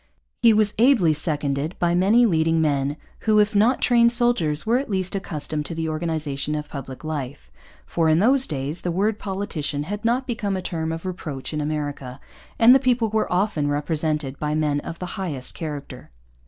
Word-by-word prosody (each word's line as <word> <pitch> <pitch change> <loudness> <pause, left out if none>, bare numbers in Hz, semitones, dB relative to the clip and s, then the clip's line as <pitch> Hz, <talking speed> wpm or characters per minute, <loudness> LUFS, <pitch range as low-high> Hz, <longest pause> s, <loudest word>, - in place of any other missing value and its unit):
He 230 - +7
was 215 -1 +3
ably 230 - +5
seconded 150 0 -2
by 175 -1 +1
many 205 +7 +4
leading 165 -4 +2
men 145 -2 0 0.2
who, 215 -1 +2
if 210 +1 +3
not 220 +6 +3
trained 235 -1 +5
soldiers, 235 -11 +1
were 235 +3 +3
at 275 - -5
least 190 -2 -1
accustomed 155 -5 -3
to 165 - -5
the 160 0 -2
organization 155 -3 -2
of 150 0 -4
public 135 -1 -8
life; 145 - -5 0.3
for 165 -2 +1
in 155 - +4
those 255 +8 +3
days 145 +3 -4
the 180 - -2
word 205 +5 0
politician 190 -8 -3
had 205 +6 -5
not 245 +3 +1
become 215 -6 -2
a - - -2
term 160 -3 -3
of 165 +2 -6
reproach 155 -7 -5
in 150 - -1
America, 145 -4 -4 0.4
and 235 +2 +7
the 270 - +6
people 245 -3 +1
were 220 0 0
often 180 -5 +1
represented 150 -1 -1
by 150 0 -1
men 150 -2 +1
of 165 - -7
the 180 - -5 0.2
highest 145 -9 -4
character. 150 -4 -7
165 Hz, 185 wpm, -23 LUFS, 150-210 Hz, 0.4 s, He